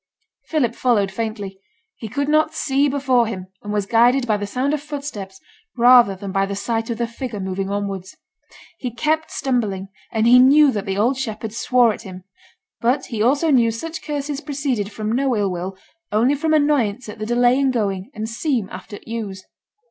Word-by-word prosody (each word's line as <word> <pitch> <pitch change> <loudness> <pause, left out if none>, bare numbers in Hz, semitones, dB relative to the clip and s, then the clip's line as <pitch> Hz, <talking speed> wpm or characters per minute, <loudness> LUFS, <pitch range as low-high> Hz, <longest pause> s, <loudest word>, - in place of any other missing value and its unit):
Philip 265 -8 0
followed 220 -6 +1
faintly. 205 -2 -5 0.4
He 220 - -8
could 280 +5 -2
not 310 +1 +2
see 280 0 +1
before 260 -4 +2
him, 185 -4 -6
and 205 - -6
was 205 -1 0
guided 240 +4 +4
by 220 -3 +2
the 205 0 -3
sound 260 +7 -1
of 300 - -1
footsteps 280 -11 -7 0.4
rather 240 -4 +6
than 195 +1 -6
by 195 +1 +1
the 200 - -4
sight 225 +3 -2
of 230 - -2
the 235 - 0
figure 235 -2 -6
moving 190 0 -3
onwards. 200 -2 -4 0.6
He 250 - -3
kept 305 +7 -1
stumbling; 210 -8 -2 0.2
and 220 0 +1
he 245 +2 +7
knew 280 +3 +6
that 205 -4 -4
the 195 0 -2
old 240 +6 +2
shepherd 220 -4 -4
swore 240 -1 +3
at - - -9
him; 185 -1 -10 0.6
but 245 +4 +1
he 215 - -1
also 285 +7 +3
knew 240 -4 +4
such 320 +9 -5
curses 290 -1 -4
proceeded 270 -9 -2
from 215 +1 -3
no 255 0 +1
ill 200 -2 0
will, 180 +2 -5 0.3
only 230 +6 +3
from 310 +2 +1
annoyance 260 -7 +1
at 210 +1 -9
the 215 - -3
delay 245 +2 +3
in 275 -1 +2
going 200 -4 -1
and 215 +1 -3
'seem' 235 - -1
after 190 +3 -8
t' - - -19
ewes.' 200 -5 -5
230 Hz, 195 wpm, -21 LUFS, 205-270 Hz, 0.6 s, he